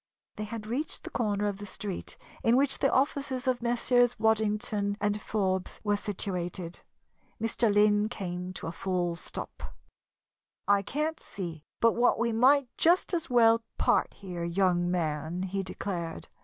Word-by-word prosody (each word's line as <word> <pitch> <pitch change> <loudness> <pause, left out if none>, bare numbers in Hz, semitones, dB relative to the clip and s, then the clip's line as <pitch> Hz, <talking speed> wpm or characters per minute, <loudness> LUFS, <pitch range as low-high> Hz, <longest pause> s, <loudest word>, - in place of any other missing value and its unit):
They 215 - -3
had 215 0 -6
reached 260 +8 -3
the - - -7
corner 210 -3 0
of 205 -2 -1
the 205 - -6
street 195 -1 -6 0.2
in 230 +2 +4
which 275 0 +2
the - - +3
offices 270 -1 0
of 255 -2 +1
Messrs. 245 0 +3
Waddington 210 -2 +1 0.2
& 210 - -5
Forbes 190 -3 -1
were 205 -1 +2
situated. 180 -4 -3 0.6
Mr. 225 0 +1
Lynn 210 +1 +4
came 180 -5 -5
to - - -7
a 165 - -3
full 175 -1 -1
stop. 170 - -7 1.1
"I 200 -1 +4
can't 305 +9 -2
see 170 -6 -6
but 230 - +5
what 245 +1 +3
we 235 0 +1
might 260 +4 +4
just 350 +3 +3
as 335 -4 -1
well 230 -2 +5 0.2
part - - +2
here, 180 -3 -6
young 175 0 +2
man," 165 0 -1
he 195 +1 -2
declared. 175 -3 -5
205 Hz, 155 wpm, -29 LUFS, 185-240 Hz, 1.1 s, but